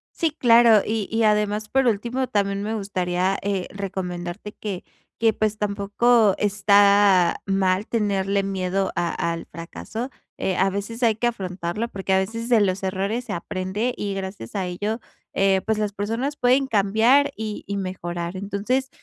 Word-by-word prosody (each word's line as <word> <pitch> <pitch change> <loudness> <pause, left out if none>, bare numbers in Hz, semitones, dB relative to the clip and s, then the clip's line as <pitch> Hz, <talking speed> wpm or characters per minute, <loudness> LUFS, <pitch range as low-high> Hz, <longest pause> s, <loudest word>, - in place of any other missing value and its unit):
Sí, 325 -3 +1
claro. 235 -6 +6
Y 215 -2 -1
y 225 0 +1
además, 210 0 +1
por 270 -1 +2
último, 240 +4 0
también 200 -2 0
me 220 +2 -2
gustaría, 185 -2 -1
eh, 195 -2 -2
recomendarte 185 0 -5
que 200 -4 -5 0.4
que 225 -1 +3
pues 215 -1 -1
tampoco 210 +2 +2
está 200 -2 +4
mal 195 +1 +1
tenerle 200 -3 0
miedo 190 0 -1
a 175 -1 0 0.2
al 165 - -5
fracaso. 220 - -6 0.3
Eh, 185 - -1
a 190 +1 +3
veces 210 +5 -4
hay 225 -2 +4
que 240 +3 0
afrontarlo 190 0 -3
porque 195 -2 -2
a 190 - +5
veces 225 +5 -2
de 235 -4 +4
los 190 -1 +1
errores 200 +6 -2
se - - -4
aprende 190 +7 -2
y 200 -1 -3
gracias 190 - -6
a 190 - -1
ello, 205 +6 -3 0.3
eh, 195 -1 +3
pues 220 -1 0
las 210 -1 -1
personas 230 +8 -2
pueden 260 +2 +3
cambiar 230 +7 +3
y 215 -1 -5
y 200 - -3
mejorar, 175 -2 -4
entonces, 210 +7 -1
200 Hz, 160 wpm, -23 LUFS, 190-225 Hz, 0.4 s, claro